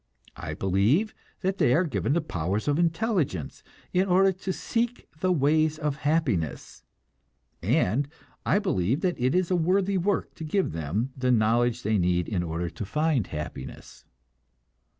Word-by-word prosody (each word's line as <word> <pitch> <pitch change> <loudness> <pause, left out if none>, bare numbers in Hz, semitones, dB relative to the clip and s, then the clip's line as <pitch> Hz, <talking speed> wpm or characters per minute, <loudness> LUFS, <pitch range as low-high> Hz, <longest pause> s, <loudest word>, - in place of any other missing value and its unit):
I 80 -1 -5
believe 105 - +2 0.3
that 190 +1 -1
they 125 - +4
are 175 - +3
given 150 -4 -1
the 170 - +2
powers 95 - -2
of 145 +2 +2
intelligence 165 - 0 0.3
in 185 +2 +2
order 190 +1 +5
to 190 +1 -4
seek 235 +5 -2
the 185 +2 +1
ways 155 0 +2
of 150 -2 -2
happiness, 140 - -1 0.8
and 130 +9 +1 0.4
I - - +2
believe 145 - 0
that 180 -2 0
it 130 +5 +2
is 185 0 +1
a - - +4
worthy 185 +3 +2
work 200 +3 -1
to - - -6
give 185 +5 0
them 85 - -2
the 130 -1 -1
knowledge 120 +1 +2
they 105 0 +1
need 90 0 +1
in 100 -5 -1
order 85 0 -3
to - - -6
find 150 - 0
happiness. 75 -3 -7
145 Hz, 155 wpm, -27 LUFS, -, 0.8 s, order